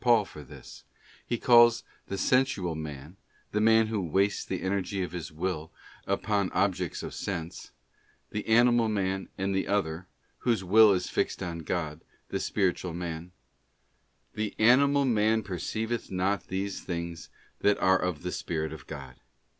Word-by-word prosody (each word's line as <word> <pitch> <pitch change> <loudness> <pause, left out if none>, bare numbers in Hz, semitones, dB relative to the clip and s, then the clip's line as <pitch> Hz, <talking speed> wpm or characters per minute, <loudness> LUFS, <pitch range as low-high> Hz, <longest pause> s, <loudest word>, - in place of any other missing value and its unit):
Paul 120 -4 +4
for 75 - -11
this; 70 - -12 0.4
he 120 - 0
calls 120 -1 +6 0.2
the 100 - -4
sensual 105 -6 +1
man—the 80 +7 -7
man 110 0 +5
who 110 -2 -2
wastes 95 +4 +1
the - - -4
energy 95 0 -1
of 90 - -5
his 85 -2 -6
will 80 -1 -3 0.4
upon 100 -3 0
objects 95 -2 0
of - - -6
sense—the 90 +3 -7
animal 120 0 +4
man, 95 -2 -1
and 95 +1 -1
the 95 - 0
other, 90 -3 -1 0.3
whose 115 -6 0
will 105 +3 +7
is 90 -2 0
fixed - - -1
on 85 -2 -4
God, 80 -1 -3 0.3
the - - -2
spiritual 90 -3 -1
man: 85 0 -5 1.0
'The 110 -1 -3
animal 140 +5 +5
man 110 -2 +2
perceiveth 110 +5 -3
not 95 +1 -1
these 95 +1 -3
things 85 -1 -5 0.3
that 105 0 +3
are 95 0 +3
of 90 -4 -2
the 90 - -3
Spirit 80 -3 -3
of 75 -5 -11
God. 65 -4 -9
95 Hz, 145 wpm, -28 LUFS, 85-110 Hz, 1.0 s, will